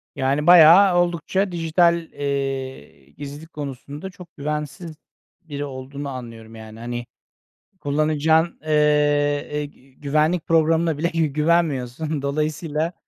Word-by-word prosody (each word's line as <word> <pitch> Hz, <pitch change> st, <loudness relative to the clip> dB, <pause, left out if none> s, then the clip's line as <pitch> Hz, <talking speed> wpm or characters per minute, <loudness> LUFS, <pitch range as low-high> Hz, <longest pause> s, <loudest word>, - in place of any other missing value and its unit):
Yani, 140 Hz, +3 st, 0 dB
bayağı 175 Hz, +2 st, +8 dB
oldukça 175 Hz, +3 st, 0 dB
dijital, 170 Hz, 0 st, +2 dB
eee, 135 Hz, -, -5 dB
gizlilik 145 Hz, -, -10 dB
konusunda 145 Hz, +4 st, -7 dB
çok 180 Hz, -2 st, -15 dB
güvensiz 150 Hz, +3 st, -5 dB, 0.5 s
biri 145 Hz, -4 st, -6 dB
olduğunu 140 Hz, +1 st, -7 dB
anlıyorum. 115 Hz, -3 st, -9 dB
Yani, 110 Hz, 0 st, -11 dB
hani, 120 Hz, +1 st, -5 dB, 0.7 s
kullanacağın, 155 Hz, +2 st, +1 dB
eee, -, -, -6 dB, 0.8 s
eee, 150 Hz, 0 st, -2 dB
gü 135 Hz, -2 st, -18 dB
güvenlik 155 Hz, +4 st, 0 dB
programına 165 Hz, -1 st, +2 dB
bile 165 Hz, +3 st, 0 dB
gü 165 Hz, -1 st, +2 dB
güvenmiyorsun. 150 Hz, -2 st, 0 dB
Dolayısıyla 155 Hz, +3 st, -2 dB
150 Hz, 110 wpm, -22 LUFS, 140-165 Hz, 0.8 s, bayağı